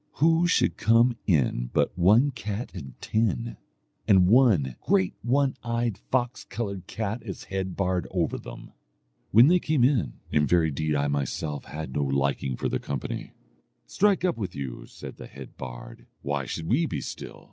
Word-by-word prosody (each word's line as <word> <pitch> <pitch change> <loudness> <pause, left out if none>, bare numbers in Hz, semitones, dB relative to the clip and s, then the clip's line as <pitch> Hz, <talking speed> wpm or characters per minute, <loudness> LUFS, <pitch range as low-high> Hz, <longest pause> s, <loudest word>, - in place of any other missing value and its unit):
Who 165 +3 +3
should 180 - +2
come 115 +2 +4
in 65 - +1
but - - +1
one 105 - +4
cat 110 -1 -5
and 70 -9 -9
ten, 75 - -1 0.5
and 95 -2 +6
one 100 - +4
great 95 -2 +2
one 135 +2 +1
eyed 115 -2 -1
fox 125 -1 0
coloured 100 -6 -5
cat 110 +2 -3
as 100 -5 -7
head 95 -1 -2
bard 90 -2 0
over 90 -3 -1
them. - - -10 0.6
When 115 +4 +7
they 180 +5 +5
came 155 -6 +1
in, 120 - +2 0.2
in 75 -1 +2
very 85 -3 +3
deed 75 +2 -1
I 70 0 +1
myself 70 +1 -2
had 75 0 -6
no 70 - 0
liking 70 -2 0
for - - -1
their - - -1
company. 70 -3 -5 0.5
'Strike 195 - +2
up 175 - 0
with 100 -5 -4
you,' 65 -3 -6
said - - -10
the - - -9
head 70 -1 -11
bard, - - -9 0.2
'why 70 -2 -2
should 80 - -4
we 145 - +2
be - - -3
still? - - -7
95 Hz, 170 wpm, -26 LUFS, 70-120 Hz, 0.6 s, When